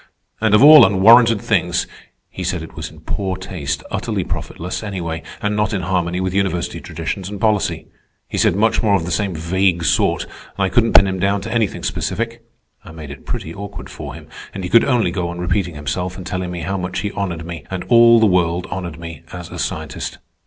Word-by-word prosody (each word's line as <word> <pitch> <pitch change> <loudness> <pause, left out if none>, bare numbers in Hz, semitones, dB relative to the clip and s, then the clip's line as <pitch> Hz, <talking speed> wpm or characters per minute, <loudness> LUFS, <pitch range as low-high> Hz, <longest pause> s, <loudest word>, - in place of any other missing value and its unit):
And 110 -2 +4
of 105 - +6
all 150 +1 +10
unwarranted 115 +3 +6
things! 90 -5 0 0.5
He - - -6
said - - -2
it - - -11
was - - -5
in - - -16
poor 95 -2 -3
taste, 75 -6 -4
utterly - - -2
profitless, 90 +2 -5
anyway, 85 -6 -4 0.2
and 105 0 0
not 105 0 0
in 95 -3 -2
harmony 90 -1 -1
with 95 0 -2
university 95 -3 -1
traditions 85 +4 -5
and 100 -1 -6
policy. 105 -1 +1 0.4
He - - -3
said - - +3
much 110 +3 +2
more 105 -3 +3
of 85 -4 -1
the 90 - -4
same 95 0 -1
vague 85 +2 +1
sort, - - +2
and - - -15 0.3
I - - 0
couldn't 115 +4 +2
pin 100 - +8
him 95 -1 -2
down 100 +2 +1
to 110 +3 -5
anything 115 -4 0
specific. - - -3 0.4
I - - -12
made 80 -3 -9
it 70 - -12
pretty 80 - -4
awkward 100 +2 -8
for - - -8
him, - - -11 0.3
and 95 - -5
he 90 - -4
could 115 - +6
only 125 -4 +2
go 90 -3 -2
on 85 - -6
repeating 90 -1 -1
himself 90 +6 -3
and 95 - -8
telling 90 -1 -3
me 90 -1 -5
how 95 +4 -2
much 90 0 -3
he 105 - -3
honored 85 -6 -4
me, 85 -1 -7
and 95 -1 -4
all 115 -1 +6
the 110 - +5
world 90 -2 +2
honored 85 -4 -5
me, 85 -3 -8
as 90 -2 -8
a - - -7
scientist. - - -4
95 Hz, 215 wpm, -19 LUFS, 85-100 Hz, 0.5 s, all